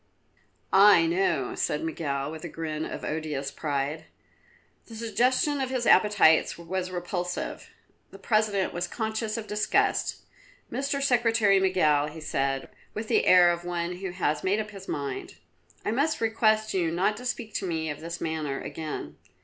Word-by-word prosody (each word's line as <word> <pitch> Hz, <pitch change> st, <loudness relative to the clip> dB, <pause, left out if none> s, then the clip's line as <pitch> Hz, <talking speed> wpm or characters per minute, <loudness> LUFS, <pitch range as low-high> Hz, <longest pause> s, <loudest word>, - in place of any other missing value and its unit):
"I 195 Hz, -3 st, +7 dB
know," 165 Hz, -6 st, 0 dB
said 150 Hz, -, -1 dB
Miguel 145 Hz, -3 st, -2 dB
with 160 Hz, -1 st, -8 dB
a 175 Hz, -, -5 dB
grin 155 Hz, -1 st, -4 dB
of -, -, -6 dB
odious 150 Hz, -3 st, -3 dB
pride. 145 Hz, 0 st, -3 dB, 0.8 s
The 230 Hz, -, -10 dB
suggestion 250 Hz, +6 st, +1 dB
of 260 Hz, -, -1 dB
his 255 Hz, -2 st, -1 dB
appetites 200 Hz, -7 st, +5 dB
was 180 Hz, +2 st, -3 dB
repulsive. 180 Hz, 0 st, -4 dB, 0.4 s
The -, -, -12 dB
President 215 Hz, -3 st, +1 dB
was 175 Hz, 0 st, -2 dB
conscious 220 Hz, -1 st, -3 dB
of 225 Hz, -, -5 dB
disgust. 210 Hz, 0 st, 0 dB, 0.5 s
"Mr. 275 Hz, 0 st, -1 dB
Secretary 230 Hz, -6 st, +3 dB
Miguel," 155 Hz, -6 st, +3 dB
he 155 Hz, +2 st, -9 dB
said 135 Hz, -3 st, -2 dB, 0.3 s
with 215 Hz, 0 st, -5 dB
the -, -, +2 dB
air 180 Hz, -1 st, +7 dB
of 170 Hz, 0 st, -3 dB
one 175 Hz, 0 st, -3 dB
who 190 Hz, +1 st, -4 dB
has 165 Hz, -4 st, -1 dB
made 200 Hz, +3 st, +1 dB
up 215 Hz, -1 st, -4 dB
his 195 Hz, -2 st, -11 dB
mind, 140 Hz, -2 st, -4 dB, 0.5 s
"I -, -, 0 dB
must 285 Hz, +7 st, +1 dB
request 220 Hz, -1 st, +2 dB
you 175 Hz, -4 st, +1 dB
not 185 Hz, +6 st, +1 dB
to 250 Hz, -, -9 dB
speak 230 Hz, -3 st, -4 dB
to 195 Hz, -, -2 dB
me 160 Hz, -2 st, -2 dB
of 145 Hz, -, -7 dB
this 170 Hz, +1 st, -6 dB
matter 155 Hz, -4 st, -3 dB
again. 155 Hz, -2 st, -6 dB
180 Hz, 160 wpm, -27 LUFS, 160-215 Hz, 0.8 s, I